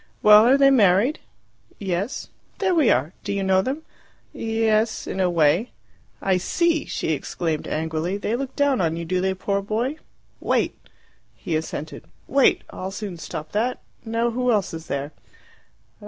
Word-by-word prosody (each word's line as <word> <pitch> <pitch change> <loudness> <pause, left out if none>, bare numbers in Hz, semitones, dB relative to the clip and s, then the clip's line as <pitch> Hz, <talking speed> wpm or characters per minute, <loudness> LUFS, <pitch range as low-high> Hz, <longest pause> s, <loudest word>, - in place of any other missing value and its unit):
"Well, 210 +2 +8
are 265 +2 +6
they 275 0 +6
married?" 215 +3 +4 0.6
"Yes." 195 +4 -3 0.3
"There 380 -2 +1
we 310 -8 +4
are. 145 +8 +1
Do 200 - -3
you 200 -1 -1
know 190 0 +3
them?" 275 +9 -3 0.5
"Yes 225 0 0
in - - -4
a 185 -1 +3
way." 170 +6 +2 0.5
"I 190 -1 +3
see," 325 - +1
she - - -3
exclaimed 160 +1 -2
angrily. 160 +4 -2
"They 210 +2 -2
look 265 +1 -5
down 285 -5 +2
on 165 -1 0
you, 170 - -4
do 180 +2 0
they, 190 0 0
poor 200 +1 -1
boy? 230 +8 -2 0.4
Wait!" - - 0 0.6
He 165 - -3
assented. 155 -1 -5 0.2
"Wait! 275 0 +3
I'll 185 - -5
soon 195 -2 -6
stop 155 -1 -7
that. 235 +5 -1 0.2
Now, 230 +1 0
who 250 +1 +1
else 205 -6 0
is 160 0 -7
there?" 140 +1 -3
200 Hz, 160 wpm, -23 LUFS, 175-240 Hz, 0.6 s, Well